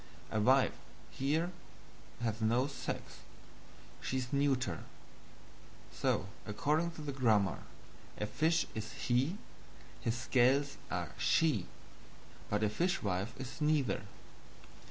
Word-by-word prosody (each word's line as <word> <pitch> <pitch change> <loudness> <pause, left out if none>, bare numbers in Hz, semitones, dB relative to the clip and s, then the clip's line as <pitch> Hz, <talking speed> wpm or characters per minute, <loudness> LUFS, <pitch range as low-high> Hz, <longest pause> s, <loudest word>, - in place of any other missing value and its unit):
A 110 - +1
Wife, 130 +5 +5 0.4
here, 155 +6 0 0.7
has 115 -1 -1
no 120 +4 +3
sex; 145 - -5 0.8
she 130 - -1
is 125 0 -3
neuter; 135 - +1 1.1
so, - - +1 0.2
according 150 +10 +1
to 155 - -8
the 145 - -3
grammar, 110 - +3 0.6
a 105 - -1
fish 160 +9 +2
is 110 0 -5
HE, 130 +10 +1 0.6
his 115 +1 -1
scales 135 +3 +3
are - - -2
SHE, 150 - +3 0.8
but 105 +1 +1
a 105 - +3
fishwife 115 - 0
is 130 +3 -7
neither. 150 -9 +2
130 Hz, 110 wpm, -34 LUFS, 110-145 Hz, 1.1 s, Wife